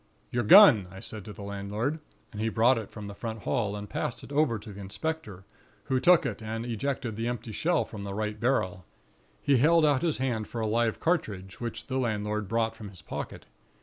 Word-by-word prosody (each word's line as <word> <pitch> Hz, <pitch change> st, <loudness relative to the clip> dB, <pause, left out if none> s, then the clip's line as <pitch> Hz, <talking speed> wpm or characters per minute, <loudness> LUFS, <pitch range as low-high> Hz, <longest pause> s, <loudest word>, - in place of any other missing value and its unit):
"'Your 120 Hz, -, +1 dB
gun,' 115 Hz, -, +8 dB
I 95 Hz, +1 st, -10 dB
said 105 Hz, +1 st, -6 dB
to 105 Hz, -, -7 dB
the 100 Hz, -, -9 dB
landlord, 100 Hz, +9 st, -3 dB, 0.3 s
and 105 Hz, -, -6 dB
he 110 Hz, -, +1 dB
brought 115 Hz, +2 st, +4 dB
it 110 Hz, -, -8 dB
from 105 Hz, -2 st, -8 dB
the 100 Hz, -, -7 dB
front 110 Hz, +1 st, -6 dB
hall, 110 Hz, -6 st, 0 dB
and 105 Hz, 0 st, -6 dB
passed 115 Hz, -, -3 dB
it -, -, -11 dB
over 140 Hz, -6 st, +2 dB
to 105 Hz, 0 st, -10 dB
the 100 Hz, -, -9 dB
inspector, 105 Hz, -, -5 dB, 0.4 s
who 130 Hz, -1 st, 0 dB
took 175 Hz, +5 st, +5 dB
it -, -, -3 dB
and 110 Hz, +1 st, -4 dB
ejected 120 Hz, 0 st, -2 dB
the 115 Hz, +2 st, -2 dB
empty 120 Hz, -2 st, -4 dB
shell 170 Hz, -, +1 dB
from 105 Hz, -, -8 dB
the 100 Hz, -1 st, -5 dB
right 105 Hz, 0 st, -3 dB
barrel. 100 Hz, -7 st, 0 dB, 0.6 s
He 140 Hz, -2 st, +4 dB
held 160 Hz, +5 st, +5 dB
out 145 Hz, -3 st, +3 dB
his 165 Hz, -3 st, +1 dB
hand 120 Hz, -5 st, -1 dB
for 120 Hz, -, -5 dB
a 110 Hz, -, 0 dB
live 115 Hz, +1 st, +1 dB
cartridge, 100 Hz, -, -2 dB
which 115 Hz, -1 st, -5 dB
the 130 Hz, 0 st, -2 dB
landlord 105 Hz, -3 st, -1 dB
brought 115 Hz, +1 st, 0 dB
from 110 Hz, -2 st, -9 dB
his 90 Hz, -5 st, -14 dB
pocket. -, -, -6 dB
115 Hz, 215 wpm, -28 LUFS, 105-130 Hz, 0.6 s, gun